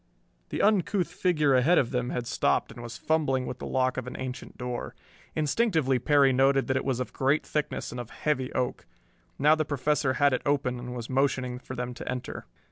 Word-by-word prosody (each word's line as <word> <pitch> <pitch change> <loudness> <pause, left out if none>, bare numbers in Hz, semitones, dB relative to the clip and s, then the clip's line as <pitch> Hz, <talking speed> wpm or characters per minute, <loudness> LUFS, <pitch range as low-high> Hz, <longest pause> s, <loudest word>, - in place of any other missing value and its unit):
The - - -1
uncouth 200 -3 +2
figure 170 -6 +2
ahead 130 +8 +4
of 120 - +2
them 125 -1 -1
had 120 - -3
stopped - - +1
and 120 - -10
was 120 0 -7
fumbling 140 -5 +1
with - - -6
the - - -5
lock 130 -1 +1
of 130 -1 -3
an 125 - -6
ancient 130 -1 -6
door. 125 -1 -5 0.4
Instinctively 155 - +2
Perry 140 -2 +4
noted 135 +1 +3
that 130 - 0
it 130 - 0
was 130 -2 0
of 125 - -4
great 140 +3 +1
thickness 150 -1 -2
and 125 - -6
of 120 -1 -6
heavy 130 -4 -1
oak. 125 -1 -2 0.5
Now 150 +2 +5
the 155 0 +1
Professor 145 -1 0
had 145 0 +3
it 130 - 0
open 135 -4 0
and 125 0 -6
was 120 -2 -5
motioning 130 -2 0
for 130 - -8
them 125 0 -4
to - - -7
enter. 125 -1 -5
130 Hz, 210 wpm, -28 LUFS, 125-150 Hz, 0.5 s, Now